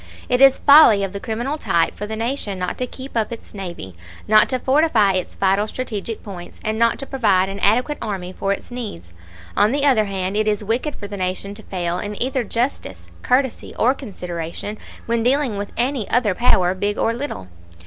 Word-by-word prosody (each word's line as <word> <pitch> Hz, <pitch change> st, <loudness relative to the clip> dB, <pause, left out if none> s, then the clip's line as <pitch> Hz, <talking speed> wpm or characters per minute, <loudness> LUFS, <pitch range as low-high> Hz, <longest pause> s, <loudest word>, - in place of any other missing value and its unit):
It 250 Hz, +1 st, +2 dB
is 270 Hz, -1 st, +7 dB
folly 280 Hz, -9 st, +7 dB
of 195 Hz, 0 st, -3 dB
the 200 Hz, -, -4 dB
criminal 240 Hz, +8 st, -3 dB
type 165 Hz, -, +1 dB
for 210 Hz, -, -6 dB
the 220 Hz, -, -4 dB
Nation 225 Hz, -3 st, -2 dB
not 180 Hz, 0 st, -3 dB
to 250 Hz, -, -1 dB
keep 260 Hz, +1 st, -9 dB
up 225 Hz, 0 st, 0 dB
its 230 Hz, -, -9 dB
navy, 175 Hz, -, -7 dB, 0.3 s
not 215 Hz, 0 st, +5 dB
to 255 Hz, -, 0 dB
fortify 260 Hz, -6 st, +3 dB
its 185 Hz, -1 st, -3 dB
vital 195 Hz, +2 st, +2 dB
strategic 225 Hz, -3 st, -5 dB
points, 180 Hz, -4 st, -9 dB
and 215 Hz, +1 st, -2 dB
not 230 Hz, 0 st, +3 dB
to 275 Hz, -, -5 dB
provide 200 Hz, -9 st, +2 dB
an 195 Hz, +1 st, -6 dB
adequate 250 Hz, +9 st, +2 dB
army 185 Hz, -3 st, -4 dB
for 195 Hz, -, -2 dB
its 200 Hz, -, -4 dB
needs. 205 Hz, -, -7 dB, 0.4 s
On 210 Hz, -, +4 dB
the 285 Hz, +1 st, +1 dB
other 245 Hz, -7 st, +4 dB
hand, 190 Hz, -1 st, -3 dB
it 215 Hz, 0 st, +1 dB
is 210 Hz, 0 st, 0 dB
wicked 240 Hz, +8 st, -1 dB
for 205 Hz, -, -7 dB
the 200 Hz, 0 st, -7 dB
Nation 185 Hz, +2 st, -3 dB
to 215 Hz, -, -10 dB
fail 180 Hz, -3 st, -3 dB
in 210 Hz, 0 st, -5 dB
either 260 Hz, 0 st, 0 dB
justice, 195 Hz, -, -3 dB
courtesy, 260 Hz, 0 st, 0 dB
or 250 Hz, +3 st, +3 dB
consideration 180 Hz, -, -6 dB, 0.3 s
when 230 Hz, 0 st, 0 dB
dealing 255 Hz, -1 st, +1 dB
with 200 Hz, 0 st, -5 dB
any 245 Hz, -2 st, 0 dB
other 230 Hz, -5 st, +2 dB
power, 185 Hz, -4 st, +3 dB
big 205 Hz, +2 st, -2 dB
or 230 Hz, -, +1 dB
little. 240 Hz, -, -5 dB
215 Hz, 200 wpm, -21 LUFS, 195-250 Hz, 0.4 s, is